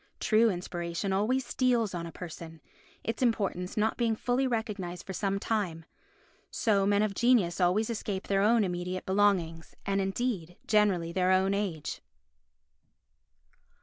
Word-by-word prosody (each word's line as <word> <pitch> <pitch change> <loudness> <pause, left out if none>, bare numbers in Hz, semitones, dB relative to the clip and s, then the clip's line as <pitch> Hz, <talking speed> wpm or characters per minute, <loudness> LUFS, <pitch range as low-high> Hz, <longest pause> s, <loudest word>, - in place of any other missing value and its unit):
True 225 +1 +4
inspiration 175 0 -3
always 240 +7 +1
steals 240 -6 +1
on 170 -1 -4
a - - -8
person; 165 -2 -9 0.4
its 225 +2 -3
importance 200 -7 0
not 215 +1 +1
being 230 -2 +1
fully 250 +4 0
recognised 210 -7 -3
for 190 - -6
some 195 +1 -1
time. 195 -7 -2 0.6
So 200 -4 +1
men 205 +1 +3
of 215 -2 -1
genius 200 -7 +2
always 185 +5 +3
escape 205 -4 -3
their 195 -1 +2
own 220 +2 +4
immediate 180 0 -3
belongings, 190 -5 +1
and 195 0 +1
indeed 195 -4 -2
generally 200 -6 +2
their 185 +1 +1
own 190 +1 +3
age. 190 -7 -3
195 Hz, 140 wpm, -29 LUFS, 180-220 Hz, 0.6 s, True